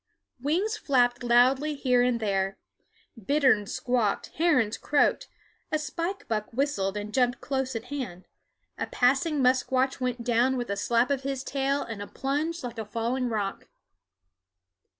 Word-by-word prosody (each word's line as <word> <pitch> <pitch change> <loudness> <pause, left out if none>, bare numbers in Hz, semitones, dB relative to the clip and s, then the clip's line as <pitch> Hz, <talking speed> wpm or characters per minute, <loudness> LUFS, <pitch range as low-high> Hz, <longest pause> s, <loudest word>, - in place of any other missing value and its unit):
Wings 370 - 0
flapped 245 - +2
loudly 255 +5 +3
here 250 -3 +2
and 245 -1 +2
there; 195 -2 -1 0.7
bitterns 260 -5 +3
squawked; 240 -5 0
herons 290 -10 +3
croaked; 295 -1 +1 0.4
a 310 - +2
spike 335 +7 -4
buck 215 -2 -2
whistled 225 -7 -1
and 210 +1 -5
jumped 250 -1 +2
close 265 -2 -2
at 225 - -3
hand; 195 -11 -5 0.5
a - - -2
passing 275 +3 +2
musquash 260 +1 +2
went 250 -2 -2
down 245 +2 +2
with 240 -4 -3
a - - 0
slap 235 +5 +1
of 275 -2 0
his 270 -1 -3
tail 275 +1 0
and 220 -3 -7
a 205 - -6
plunge 300 +4 -2
like 240 -2 -6
a - - -2
falling 235 +4 -1
rock. 205 -3 -3
255 Hz, 150 wpm, -27 LUFS, 230-280 Hz, 0.7 s, loudly